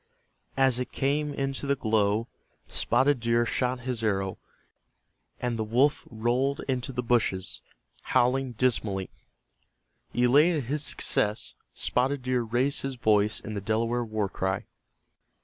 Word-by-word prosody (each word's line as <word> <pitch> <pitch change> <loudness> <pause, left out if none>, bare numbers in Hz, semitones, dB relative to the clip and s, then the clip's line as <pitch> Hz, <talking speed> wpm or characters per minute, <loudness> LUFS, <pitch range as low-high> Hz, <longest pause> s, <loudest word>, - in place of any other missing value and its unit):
As 130 -2 +3
it 125 - -3
came 145 +2 0
into 135 0 -3
the 140 - +3
glow 110 -2 +1 0.4
Spotted 140 0 +2
Deer 115 0 +2
shot 125 +1 -1
his 120 -2 -3
arrow, 95 -3 0 1.0
and 120 -2 -2
the - - +1
wolf 125 +7 +2
rolled 125 +5 0
into 130 0 -1
the 125 -1 -3
hushes, 110 -6 +1 0.4
howling 130 +1 +2
dismally. 110 -6 0 1.0
Elated 145 +6 +4
at 120 - -10
his 150 +1 0
success, 105 -6 0 0.2
Spotted 130 +2 0
Deer 125 -1 +1
raised 120 +5 0
his 135 -1 -3
voice 105 -3 +2
in 110 - -6
the 100 - -3
Delaware 115 +4 0
war 110 -3 -1
cry. 95 0 -2
120 Hz, 130 wpm, -27 LUFS, 110-135 Hz, 1.0 s, Elated